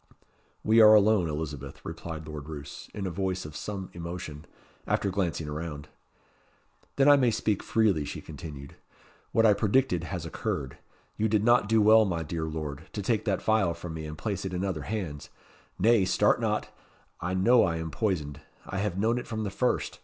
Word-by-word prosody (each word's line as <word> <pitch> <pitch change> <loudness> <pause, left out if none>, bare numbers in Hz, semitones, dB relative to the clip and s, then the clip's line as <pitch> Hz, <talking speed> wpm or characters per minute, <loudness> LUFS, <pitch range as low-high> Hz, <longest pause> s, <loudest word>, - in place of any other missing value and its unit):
"We 110 +1 +5
are 110 0 +9
alone, 105 -4 +4
Elizabeth," 75 -3 -5
replied 80 -2 -6
Lord 75 -1 -7
Roos, 75 -2 -8
in 100 - -5
a 95 - -2
voice 95 0 -2
of 75 0 -9
some 100 -3 -5
emotion, 85 -3 -7 0.4
after 100 - 0
glancing 90 -5 -1
around. 75 -1 -6 1.1
"Then 140 0 +4
I 145 0 +8
may 125 -3 +3
speak 110 -2 0
freely," 105 -9 +2
she - - -6
continued. 75 -3 -9 0.6
"What 115 - +3
I 105 - +7
predicted 100 -4 +1
has 90 -4 -5
occurred. 70 -4 -4 0.4
You 110 - +2
did 105 -1 +2
not 120 -3 +4
do 110 -1 +4
well, 110 +1 +7
my 85 -4 -2
dear 80 +1 -3
Lord, 75 -1 -5
to 105 - -4
take 110 +1 0
that 100 -4 0
phial 110 -6 +2
from 85 -1 -7
me 80 -1 -6
and 75 0 -7
place 100 -1 -3
it 95 -1 -4
in 90 +2 -1
other 90 -6 -2
hands. 90 -10 -4 0.5
Nay, 115 +1 +4
start - - +3
not! - - -2 0.4
I 90 +2 -2
know 115 +6 +5
I 85 -3 +1
am 80 -1 -4
poisoned: 75 -10 -2 0.2
I 95 - -4
have 100 -3 -2
known 115 +4 +1
it - - -8
from 110 -1 -3
the 100 - -3
first. - - -1
95 Hz, 190 wpm, -28 LUFS, 80-110 Hz, 1.1 s, are